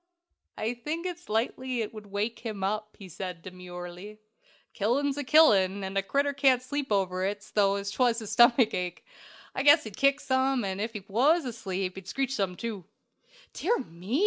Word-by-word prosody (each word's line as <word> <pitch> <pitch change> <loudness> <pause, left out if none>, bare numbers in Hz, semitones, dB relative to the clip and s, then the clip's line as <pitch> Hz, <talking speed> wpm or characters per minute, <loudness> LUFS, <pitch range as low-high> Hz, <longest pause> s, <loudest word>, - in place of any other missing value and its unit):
"I 220 +2 -1
think 305 +8 -5
it's 355 -5 -6
likely 240 +2 -1
it 215 - -7
would 215 -2 -10
wake 205 +3 -2
him 215 -5 -5
up," 210 +2 -2
said 185 +1 -6
he, 165 - -24
demurely. 180 +2 -9 0.6
"Killin' 270 +7 +1
's 290 - -4
killin', 200 -11 +5
and 190 0 -5
a 195 - +3
critter 280 +8 0
can't 265 -3 +3
sleep 285 -1 -3
over 185 -2 +1
it 205 +1 -2
's - - -16
though 200 -1 +2
'twas 230 +4 +1
the 225 - -5
stomachache. 220 -5 +3 0.5
I - - -1
guess 290 +2 +6
he'd 215 -3 -8
kick 275 +1 +3
some, 260 -2 +1
ef 200 +4 -3
he 205 -3 -7
was 275 - +3
asleep 195 -6 -4
and 190 -1 -9
screech 270 +4 -1
some, 195 -7 -1
too!" 210 -4 -5 0.7
"Dear 455 +8 +1
me!" 185 - -3
220 Hz, 175 wpm, -28 LUFS, 195-265 Hz, 0.7 s, guess